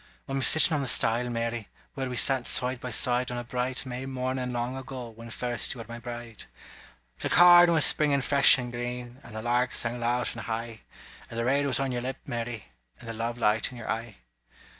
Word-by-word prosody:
I'm 135 0 -2
sittin' 160 +4 +5
on 150 - 0
the 135 - -3
stile, 120 +1 +3
Mary, 115 -1 -3 0.3
Where 135 -2 -4
we 125 - -5
sat 130 -1 +3
side 125 0 0
by 125 - -5
side 125 +1 +1
On 125 - -4
a 120 - -4
bright 125 +2 -3
May 130 +1 -6
mornin' 130 -1 -3
long 120 +1 -3
ago, 130 -2 -7
When 115 +1 -12
first 120 +1 -2
you - - -12
were 115 - -8
my 115 0 -8
bride; 120 -2 -8 0.7
The - - -3
corn 175 0 +7
was 160 -3 +5
springin' 145 -2 +3
fresh 140 +1 +6
and 125 -1 -5
green. 120 +1 -6
And 115 - -13
the 110 - -6
lark 120 +1 0
sang 120 +1 -2
loud 120 +1 0
and 115 - -8
high 115 0 -5 0.5
And 115 - -8
the 115 - -1
red 140 +3 +1
was 130 -2 +1
on 135 -1 -1
your 120 -1 -3
lip, 130 +2 -4
Mary, 115 -2 -5 0.3
And 120 - -12
the 115 - -5
love 115 +1 -4
light 110 0 +1
in 125 - -11
your 115 - -5
eye. 115 -1 -5
125 Hz, 220 wpm, -27 LUFS, 115-130 Hz, 0.7 s, corn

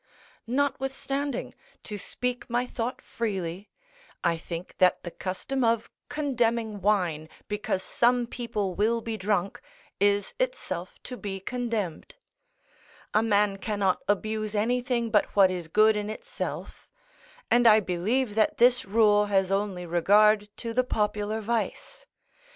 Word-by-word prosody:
Notwithstanding, 275 +1 -1 0.3
to 210 - -5
speak 245 +5 -4
my 240 +1 +1
thought 245 0 -4
freely, 195 -4 -4 0.5
I 170 - +2
think 170 +2 -7
that 185 -1 +4
the 175 - -6
custom 245 +10 -3
of 230 -1 +1 0.2
condemning 235 -7 0
wine, 175 -6 +1 0.2
because 210 -2 -2
some 245 0 +2
people 230 -5 -3
will 225 +4 +1
be 225 0 -4
drunk, 200 -2 -1 0.4
is 205 0 +2
itself 185 - -3
to 250 - -7
be 195 -4 -5
condemned; 225 - -3 1.0
a 215 - +4
man 205 -2 +2
cannot 200 -2 0
abuse 215 +1 -1
anything 240 +1 0
but 210 - +2
what 195 -2 +6
is 175 -3 -4
good 215 +5 +4
in 210 0 -2
itself; - - -6 0.6
and 240 0 +5
I 220 -1 +8
believe 210 +6 0
that 215 0 +2
this 245 +1 +4
rule 210 0 +4
has 195 -2 +2
only 195 -3 -1
regard 205 +5 +4
to 230 -1 -5
the 255 +2 +3
popular 210 -2 -1
vice. 235 - -3
215 Hz, 130 wpm, -27 LUFS, 195-240 Hz, 1.0 s, I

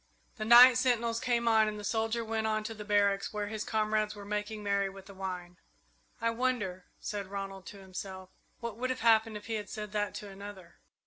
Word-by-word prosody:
The 215 - -3
night 245 +2 +9
sentinels 235 -2 +1
came 235 -1 0
on 220 -1 +5
and 210 0 -3
the - - -8
soldier 225 +2 0
went 220 0 -1
on 215 0 0
to 225 +1 -4
the 215 -1 -8
barracks, 200 -1 +2
where 210 -1 -2
his 215 0 -3
comrades 215 -1 0
were 205 -1 -9
making 210 +1 -3
merry 200 -1 +1
with 195 0 -12
the 200 - -12
wine. 180 -2 -6 0.6
"I 230 0 +1
wonder," 230 -7 -1
said 205 -2 -4
Ronald 195 -1 -6
to 205 - -9
himself, 190 -1 -8 0.3
"what 235 -2 -5
would 255 +2 -2
have 255 - -2
happened 225 -1 +4
if 210 - -12
he 225 - -4
had 210 -2 -3
said 210 -1 -6
that 210 -1 -1
to - - -6
to 200 - -9
another?" 195 -3 -10
210 Hz, 215 wpm, -31 LUFS, 200-225 Hz, 0.6 s, night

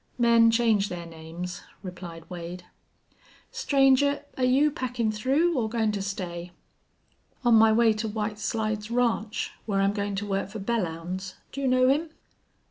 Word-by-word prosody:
"Men 235 -1 +5
change 225 -3 +2
their 175 -1 -6
names," 165 +2 -7 0.2
replied 175 -3 -8
Wade. 175 0 -7 0.9
"Stranger, 275 0 +3
air 255 - +1
you 275 +4 +4
packin' 245 -6 -1
through 275 +11 +1
or 230 -4 0
goin' 220 -1 +1
to 205 -1 -3
stay?" 180 -3 -5 0.9
"On 240 - +5
my 225 0 +7
way 225 0 +4
to 215 +1 -3
White 210 0 -3
Slides 215 -1 -2
Ranch, 235 -2 0 0.2
where 200 -2 +1
I'm 195 +1 +2
goin' 205 -1 -2
to 200 +1 -3
work 195 -1 -2
for 215 +2 -7
Belllounds. 185 -3 -3 0.2
Do 275 - -5
you 270 - +1
know 255 0 +4
him?" 300 +5 +2
215 Hz, 155 wpm, -27 LUFS, 190-240 Hz, 0.9 s, my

